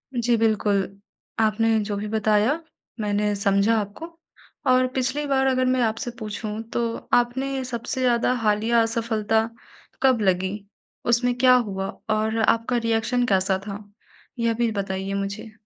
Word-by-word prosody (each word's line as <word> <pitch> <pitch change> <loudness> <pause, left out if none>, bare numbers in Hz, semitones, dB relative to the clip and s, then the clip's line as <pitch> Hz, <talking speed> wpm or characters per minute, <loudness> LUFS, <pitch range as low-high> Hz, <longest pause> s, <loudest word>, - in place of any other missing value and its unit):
जी, 240 0 +2
बिल्कुल। 210 -3 +2 0.6
आपने 225 0 +2
जो 205 0 -3
भी 210 +1 -4
बताया 215 +3 +2 0.5
मैंने 210 0 0
समझा 200 +3 +2
आपको 205 +11 -6 0.6
और 255 0 +4
पिछली 265 +3 -1
बार 270 -1 +2
अगर 255 -1 +2
मैं 255 0 +2
आपसे 225 +1 -1
पूछूँ 215 0 -5 0.2
तो 240 - 0 0.3
आपने 260 +2 +1
सबसे 245 +2 -4
ज़्यादा 245 0 +2
हालिया 220 +2 +3
असफलता 225 -1 0 0.5
कब 255 -4 +4
लगी? 190 0 +1 0.5
उसमें 245 +1 +2
क्या 255 0 +6
हुआ? 195 -5 -1 0.2
और 215 +1 +1
आपका 230 +2 +2
रिएक्शन 230 +2 +1
कैसा 190 -3 +2
था? 205 +1 -6 0.6
यह 230 0 +2
भी 230 0 0
बताइए 195 -1 -3
मुझे। 200 +2 -4
225 Hz, 140 wpm, -24 LUFS, 205-245 Hz, 0.6 s, क्या